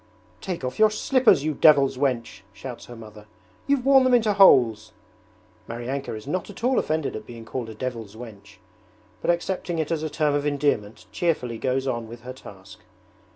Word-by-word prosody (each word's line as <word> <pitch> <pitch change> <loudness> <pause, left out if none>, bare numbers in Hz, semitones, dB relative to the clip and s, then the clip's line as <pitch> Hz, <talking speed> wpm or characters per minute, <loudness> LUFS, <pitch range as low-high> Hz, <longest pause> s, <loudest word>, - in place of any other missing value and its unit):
'Take 180 -7 -5
off 125 +7 -4
your 215 0 +6
slippers, 215 - +3
you 155 0 -1
devil's 140 -3 +5
wench!' 125 -7 -2
shouts 120 +4 -9
her 120 - -10
mother, 110 -2 -13 0.4
'you've 280 -3 +1
worn 270 -1 +6
them 255 -1 +4
into 220 -3 +2
holes!' 115 - +5 0.8
Maryanka 120 +2 -4
is 110 - -9
not 180 +8 -3
at 205 - -11
all 255 +1 +3
offended 155 -1 -2
at - - -8
being 115 -2 -10
called 120 -1 -5
a 110 - -9
'devil's 115 -3 -6
wench', 110 -4 -12 0.6
but - - -3
accepting 175 0 -1
it 160 0 -2
as 165 -2 -1
a 155 - -3
term 150 -1 0
of 145 0 0
endearment 140 -7 -1
cheerfully 125 -9 -1
goes 130 0 -1
on 120 -4 -3
with 115 +1 -11
her 125 +2 -8
task. 100 -4 -13
135 Hz, 185 wpm, -24 LUFS, 115-170 Hz, 0.8 s, your